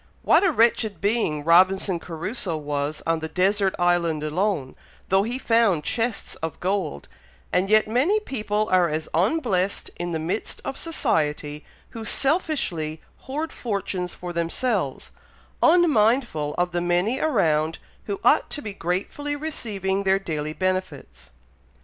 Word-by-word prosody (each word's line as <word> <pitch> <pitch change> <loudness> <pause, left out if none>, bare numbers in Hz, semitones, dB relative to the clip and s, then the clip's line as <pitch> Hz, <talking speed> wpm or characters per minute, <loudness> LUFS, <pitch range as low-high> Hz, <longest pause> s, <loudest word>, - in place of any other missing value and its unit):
"What - - +5
a 385 - +4
wretched 225 - +2
being 200 -7 0
Robinson 185 +2 +4
Crusoe 175 +2 -4
was 145 0 -3
on 165 0 +1
the 160 - -4
desert 190 +3 +1
island 175 -3 +1
alone, 155 -3 -1 0.3
though 190 +1 +4
he 235 +5 -2
found 225 -10 +2
chests 230 +3 -2
of 160 -2 -5
gold, 185 - -2 0.5
and 185 +2 +2
yet 215 0 +5
many 275 - +2
people 215 - -2
are 180 -2 +4
as 155 +1 -3
unblessed 195 - 0
in 175 0 -3
the 165 - -1
midst 165 +7 -3
of - - -3
society, 150 - -1 0.3
who 225 - -7
selfishly 220 - 0 0.3
hoard 305 +4 -3
fortunes 195 -5 -3
for 175 -1 -6
themselves, 170 - -1 0.5
unmindful 240 - +3
of 180 0 +1
the 175 0 -1
many 175 +8 +1
around 160 - +1 0.3
who 400 - -3
ought - - +4
to 290 - -5
be 210 - -5
gratefully 200 - -3
receiving 205 - -2
their 195 0 +3
daily 155 -5 -4
benefits." 185 - -3
190 Hz, 135 wpm, -24 LUFS, 165-230 Hz, 0.5 s, What